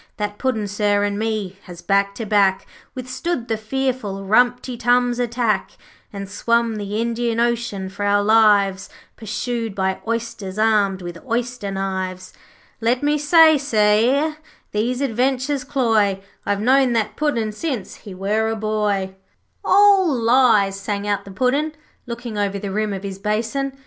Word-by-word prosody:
That 205 0 -4
Puddin', 225 -6 -1
sir, 205 0 +1
and 205 0 -1
me, 215 -4 -3
has, 175 -2 -11
back 200 0 +1
to 225 - -5
back, 195 -2 +2 0.3
Withstood 255 +2 -4
the 225 - 0
fearful 220 -3 -3
Rumty 245 +4 +2
Tums' 245 +1 +2
attack, 235 -2 -1 0.4
And 200 -1 -6
swum 230 +3 0
the 205 +1 -3
Indian 235 0 -1
Ocean 235 -5 -1
for 200 +2 -6
our 205 0 +2
lives, 205 -3 +3 0.3
Pursued 225 0 -4
by 190 -1 -1
Oysters, 225 -4 -4
armed 205 -4 +2
with 175 -1 -8
oyster 245 -3 -3
knives. 190 -1 -4 0.5
Let 240 +4 0
me 295 +1 +2
but - - -5 0.4
say, 215 -3 +3
e'er 305 +3 0 0.3
these 240 +5 -1
adventures 260 +2 0
cloy, 225 -7 +1 0.3
I've 205 0 0
knowed 255 +1 +3
that 220 -2 -1
Puddin' 235 -8 -1
since 235 - -4
he 200 -4 -11
were 210 +4 0
a 225 - -1
boy.' 210 -3 -1 0.5
'All 395 -3 +5
lies,' 230 -5 +3
sang 200 0 -3
out 205 -1 -1
the 200 - -10
Puddin', 275 +9 0 0.3
looking 235 -2 -5
over 200 -1 -1
the 200 0 -5
rim 215 +1 -1
of 195 0 -5
his 195 -1 -6
basin. 225 +7 -2
220 Hz, 150 wpm, -21 LUFS, 200-245 Hz, 0.5 s, All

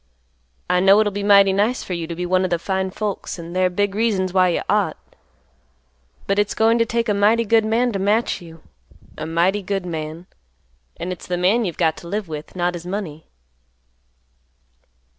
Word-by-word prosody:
I 180 0 +2
know 195 +2 +6
it'll 210 -2 +1
be 205 - -3
mighty 200 -1 +5
nice 210 +6 0
for 185 - -5
you 170 -2 -4
to 170 - -5
be 180 +1 -3
one 185 +1 +2
of 185 - 0
the 170 - +1
fine 190 +2 -2
folks 205 0 -4
and 170 +1 -8
they're 185 0 +2
big 200 +2 -1
reasons 200 -4 0
why 185 -1 +4
you 170 - -1
ought, 200 -7 +1 1.3
but 195 +1 0
it's 205 0 0
goin' 225 +1 +3
to 230 - +2
take 235 +1 -1
a 210 - +2
mighty 215 +3 +3
good 225 +1 +3
man 235 +3 +1
to 200 - -3
match 205 +1 +1
you—a 155 - -13
mighty 175 +5 +1
good 195 -1 -3
man. 160 0 -5 0.7
And 175 +2 -4
it's 180 - -8
the 180 - -1
man 200 +6 +2
you've 175 - -4
got 160 -2 +1
to 170 - -10
live 205 +2 -3
with, 155 +1 -8
not 175 0 0
his 175 0 -7
money." 180 -6 -5
190 Hz, 195 wpm, -21 LUFS, 175-205 Hz, 1.3 s, know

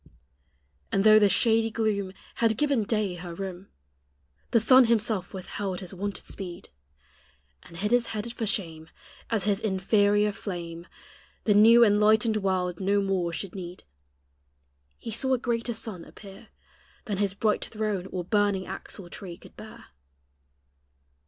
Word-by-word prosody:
And 195 - +2
though 215 0 +8
the 205 -1 +4
shady 225 +3 +3
gloom 210 -4 -1 0.2
Had 225 -2 +2
given 280 -6 +1
day 210 -3 0
her 175 -1 -8
room, 190 0 -6 0.8
The 230 - +4
sun 255 +4 +6
himself 220 -4 0
withheld 190 0 -5
his 185 -1 -7
wonted 200 +2 -5
speed, 180 -3 -7 0.9
And 170 - -14
hid 210 +5 -2
his 245 -1 +3
head 220 +2 -4
for 225 -2 -3
shame, 165 -5 -3 0.4
As 220 -4 0
his 200 0 +1
inferior 205 +1 +2
flame 175 -4 -7 0.6
The 210 - +3
new 225 +3 +7
enlightened 215 +1 +4
world 185 -3 -1
no 200 +1 +2
more 190 -3 0
should 175 +3 -5
need; 180 -2 -8 1.1
He 230 - -7
saw 260 +4 +1
a - - -1
greater 235 -1 -2
sun 215 -6 -6
appear 200 +4 -13 0.6
Than 205 -4 -3
his 200 -1 0
bright 210 0 0
throne 210 -4 -3
or 185 -2 -4
burning 205 0 +1
axle 190 0 -8
tree 175 -1 -8
could - - -17
bear. - - -12
205 Hz, 145 wpm, -27 LUFS, 185-220 Hz, 1.1 s, though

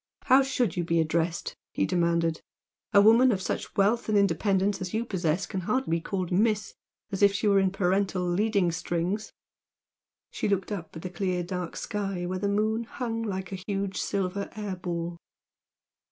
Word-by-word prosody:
"How 265 +1 +6
should 255 -8 0
you 175 - 0
be 170 0 +1
addressed?" 165 +1 0 0.2
he 95 - +1
demanded, 170 - +1 0.5
"A 200 - +7
woman 235 +4 +6
of 195 - 0
such 185 - -4
wealth 220 +4 +2
and 210 - +3
independence 200 0 +2
as 185 +2 -4
you 230 +2 0
possess 180 -3 0
can 190 - -4
hardly 215 -3 0
be - - -6
called 185 0 -3
'Miss' 210 +2 +1 0.4
as 195 - -3
if 200 -1 +6
she 210 - 0
were 200 -1 +5
in 190 -1 +3
parental 190 -1 0
leading 195 0 +2
strings!" 175 +4 -2 1.0
She - - -2
looked 195 0 0
up 170 -6 -5
at 160 - -8
the 185 - -4
clear 185 -2 -1
dark 180 -1 -4
sky 195 -4 -3
where 185 +1 -2
the 200 +1 0
moon 215 +3 +1
hung 230 -1 -4
like 190 -4 -4
a 185 -1 -6
huge 195 -1 -2
silver 200 0 -2
air 210 -3 -4
ball. 170 -1 -4
195 Hz, 180 wpm, -27 LUFS, 175-210 Hz, 1.0 s, A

